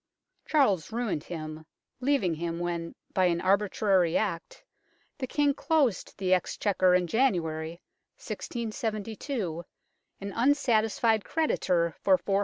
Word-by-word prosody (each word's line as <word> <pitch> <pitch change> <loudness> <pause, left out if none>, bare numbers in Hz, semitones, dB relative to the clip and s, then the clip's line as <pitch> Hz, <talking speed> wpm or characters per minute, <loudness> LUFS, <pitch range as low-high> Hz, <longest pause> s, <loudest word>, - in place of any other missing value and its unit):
Charles 210 - +2
ruined 220 -9 -2
him, 155 -2 -6 0.4
leaving 250 -9 +1
him 165 +1 -3
when, 170 -1 -3 0.2
by 185 - +3
an 170 -1 +2
arbitrary 190 -2 +2
act, 185 -6 -3 0.6
the 260 - -2
King 290 +1 +2
closed 290 - 0
the 185 -1 +1
Ex 180 - 0
chequer 185 -3 +3
in 180 - -1
January, 170 -7 0 0.4
1672, 220 - -4 0.6
an 200 0 -6
unsatisfied 230 -4 +2
creditor 180 - +1
for 190 -2 +4
416,000. 195 +1 0
195 Hz, 115 wpm, -28 LUFS, 170-235 Hz, 0.6 s, for